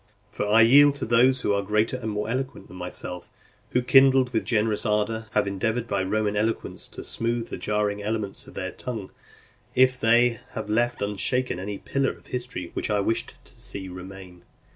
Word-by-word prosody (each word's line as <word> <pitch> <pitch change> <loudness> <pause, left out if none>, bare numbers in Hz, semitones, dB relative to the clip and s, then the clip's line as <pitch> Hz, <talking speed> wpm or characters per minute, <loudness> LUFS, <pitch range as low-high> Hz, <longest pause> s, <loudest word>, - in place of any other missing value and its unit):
For 105 - -3
I 110 +2 +6
yield 140 +5 +7
to - - -3
those 125 +3 +4
who 100 - +1
are 100 - +1
greater 105 +4 +1
and 120 -3 -4
more 105 0 -2
eloquent 130 +3 -4
than - - -11
myself, 90 0 -4 0.4
who, 125 - +1
kindled 135 -1 +5
with 110 - 0
generous 110 -2 +1
ardour, 110 +1 0
have 105 - +2
endeavoured 110 +4 -1
by 100 -3 0
Roman 105 +2 0
eloquence 110 +2 -2
to - - -9
smooth 115 0 -2
the - - -5
jarring 105 -1 -1
elements 105 -1 -3
of - - -14
their - - -3
tongue, 110 -6 -6 0.6
if 130 0 +4
they 120 0 +4
have 105 - -4
left 120 +1 +1
unshaken 105 +2 0
any 100 +2 -4
pillar 135 +5 -1
of - - -23
history 125 -8 -5
which - - -3
I 105 -1 +2
wished 115 +3 -1
to 130 - -18
see 115 -6 -6
remain. 90 -1 -10
110 Hz, 185 wpm, -25 LUFS, 105-125 Hz, 0.6 s, yield